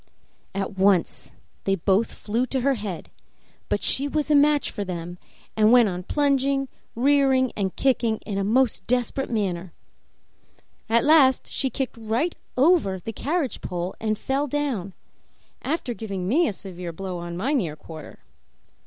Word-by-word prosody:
At 195 0 -3
once 190 -3 +2 0.3
they 195 - +2
both 195 +4 +1
flew 230 +4 -2
to 265 +1 -1
her 275 +2 +3
head; 205 -8 -6 0.6
but - - 0
she 280 +2 +4
was 305 +1 -1
a - - +6
match 290 0 +3
for 205 - -4
them, 175 -1 -6 0.4
and 215 0 +4
went 240 -4 +6
on 180 -1 -4
plunging, 275 +3 +1 0.3
rearing, 265 0 +3
and 195 -3 -2
kicking 240 -4 +1
in 200 -2 -2
a - - 0
most 240 +4 +1
desperate 250 +2 0
manner. 185 -6 -2 1.2
At 230 +1 +4
last 285 -4 +5
she 270 - -1
kicked 265 -2 -4
right 235 +10 0 0.2
over 270 - +4
the 225 +5 -6
carriage 295 - -2
pole 180 0 -4
and 215 -1 -1
fell 275 +5 -1
down, 255 -10 -2 0.7
after 270 -4 -2
giving 195 -5 -5
me 315 - +3
a - - -1
severe 180 -3 -7
blow 185 +1 -5
on 170 0 -6
my 255 +11 0
near 175 - 0
quarter. 155 0 -11
225 Hz, 155 wpm, -24 LUFS, 190-275 Hz, 1.2 s, a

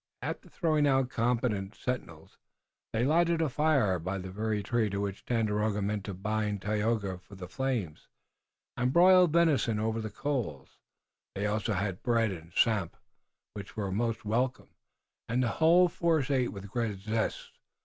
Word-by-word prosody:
After - - -5
throwing 155 -4 +1
out 135 -2 +2
competent 115 -4 0
sentinels, 125 -1 -6 0.5
they 115 +2 +1
lighted 170 +3 +3
a 160 -2 +1
fire 135 - +2
by 95 +4 -3
the 95 0 -6
very 105 +1 -2
tree 115 +1 +1
to 100 0 -3
which 100 -1 -4
Tandakora 110 -3 0
meant 100 0 -2
to 100 - -5
bind 105 0 -2
Tayoga 105 -2 -1
for 100 +3 -15
the 90 -1 -8
flames, 115 - -3 0.7
and 125 +1 0
broiled 180 +1 +6
venison 150 -10 +3
over 110 +1 -1
the 110 - -4
coals. 105 - -4 0.6
They 100 - -2
also 105 +1 0
had 95 -1 -2
bread 115 -3 +2
and 85 -2 -9
samp, 100 -2 +1 0.6
which 100 +1 -9
were 100 -3 -2
most 115 +2 -1
welcome, 125 +4 -1 0.6
and 125 +3 +1
the 120 - +1
whole 175 +3 +6
force 160 -5 0
ate 130 -5 +1
with 100 0 -9
great 115 -4 -1
zest. 110 +2 -2
110 Hz, 160 wpm, -30 LUFS, 100-130 Hz, 0.7 s, broiled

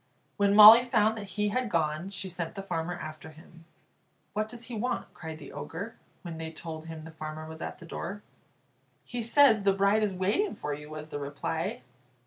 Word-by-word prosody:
When 200 0 +3
Molly 215 +3 +11
found 220 -3 +2
that 205 -2 -8
he 210 0 +2
had 250 +2 -1
gone, 160 +1 0
she 195 -1 -4
sent 175 -2 -5
the 195 - -5
farmer 175 -2 -3
after 155 -1 -8
him. 165 +1 -16 0.7
"What 215 +1 -1
does 240 0 -9
he 245 - -9
want?" 245 +4 -3
cried 160 -1 -7
the 145 -3 -11
Ogre, 200 +8 -6 0.3
when 165 -2 -6
they 160 0 -5
told 160 0 -7
him 160 -1 -7
the 160 - -10
farmer 155 0 -7
was 160 0 -9
at - - -5
the - - -12
door. 195 +5 -6 0.8
"He 245 -1 -4
says 235 -1 +5
the 195 0 +3
bride 200 +2 +3
is 205 -3 0
waiting 205 - 0
for 150 - -4
you," 150 +1 -8
was 155 0 -8
the 145 - -4
reply. 145 +1 -3
180 Hz, 200 wpm, -29 LUFS, 160-210 Hz, 0.8 s, Molly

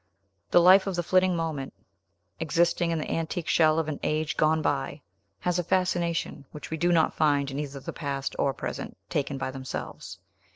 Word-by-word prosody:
The - - +6
life 190 +3 +7
of 195 - -1
the 175 - -1
flitting 185 +1 +3
moment, 160 -5 -3 0.6
existing 170 +1 +1
in 165 - 0
the 155 - -4
antique 165 +1 -2
shell 155 -1 +4
of 165 -2 0
an 155 -2 -3
age 155 0 -1
gone 155 +1 +3
by, 140 +1 -1 0.4
has 180 0 0
a - - 0
fascination 170 -4 0
which 150 - -9
we 160 - -2
do 175 +2 +2
not 165 -2 +3
find 145 -2 +2
in 135 - -4
either 140 -2 -5
the - - -7
past 140 -2 -3
or 140 - +2
present, - - -6
taken 140 -1 -1
by 135 -1 -3
themselves. 130 0 -6
160 Hz, 190 wpm, -27 LUFS, 145-175 Hz, 0.6 s, life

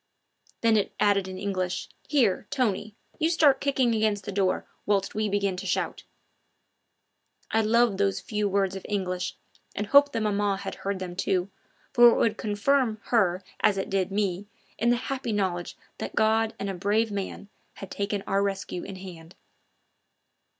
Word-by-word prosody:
Then 225 -1 +4
it 205 - -1
added 200 -2 +3
in 185 0 -6
English. 185 -2 -2 0.2
"Here, 250 -11 +2
Tony, 215 -5 -1 0.2
you 320 0 +2
start 300 -5 +4
kicking 265 -4 +2
against 215 -2 +1
the 205 - -4
door 190 -1 0 0.2
whilst 200 -1 +1
we 215 0 -1
begin 200 -1 0
to 195 +1 -5
shout!" - - -2 1.5
I 225 - +3
loved 220 -2 +3
those 195 -1 +1
few 210 -1 -2
words 195 -1 +1
of 190 - -7
English, 185 -3 -2 0.4
and 205 - -2
hoped 285 +5 +5
that 225 - -1
maman 205 -2 +1
had - - -5
heard 200 0 -2
them 180 -1 -6
too, 185 +1 0 0.4
for 240 0 +8
it - - +2
would 220 -1 +2
confirm 220 +2 +1
her 190 -5 +2 0.2
as 200 - +3
it 195 - -3
did 195 -1 0
me 200 -1 -1 0.3
in 235 +3 +2
the 240 - +4
happy 255 0 -3
knowledge 185 -4 -2 0.2
that - - -5
God 220 +1 +2
and 200 - -4
a 195 - -2
brave 210 +4 +1
man 200 0 -5 0.3
had 195 - -9
taken 200 0 -2
our 195 -1 +1
rescue 195 -2 -2
in 195 - -7
hand. 175 -3 -11
205 Hz, 170 wpm, -27 LUFS, 195-220 Hz, 1.5 s, for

